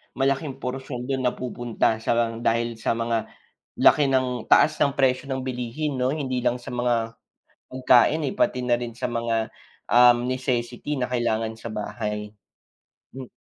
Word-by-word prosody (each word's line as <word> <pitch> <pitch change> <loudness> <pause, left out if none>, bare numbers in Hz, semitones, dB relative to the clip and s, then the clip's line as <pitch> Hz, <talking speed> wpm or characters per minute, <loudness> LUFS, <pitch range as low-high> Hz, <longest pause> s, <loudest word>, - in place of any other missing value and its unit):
malaking 135 +1 0
portion, 125 -1 -4
do'n 130 -1 -1
napupunta 120 -3 -1
sa 115 +1 0 0.2
dahil 115 0 0
sa 115 - 0
mga 115 -1 -1 0.5
laki 150 - +6
ng 125 -3 0
taas 155 - +6
ng 140 - 0
presyo 135 0 +1
ng 130 - -2
bilihin 130 +3 -3
'no? 130 +2 0
Hindi 130 -5 -3
lang 125 0 +1
sa - - -11
mga, 120 -2 -1 0.5
pagkain, 130 +4 +3
eh, 135 - -2
pati 125 0 0
na 120 - +2
rin 115 -1 -6
sa - - -3
mga, 115 -2 -2 0.4
um, 120 0 +6
necessity 130 +2 -2
na 125 - 0
kailangan 115 -2 -1
sa 115 +1 -8
bahay. 105 -1 -4 0.8
Hmm. 130 -1 -9
125 Hz, 150 wpm, -24 LUFS, 115-130 Hz, 0.8 s, laki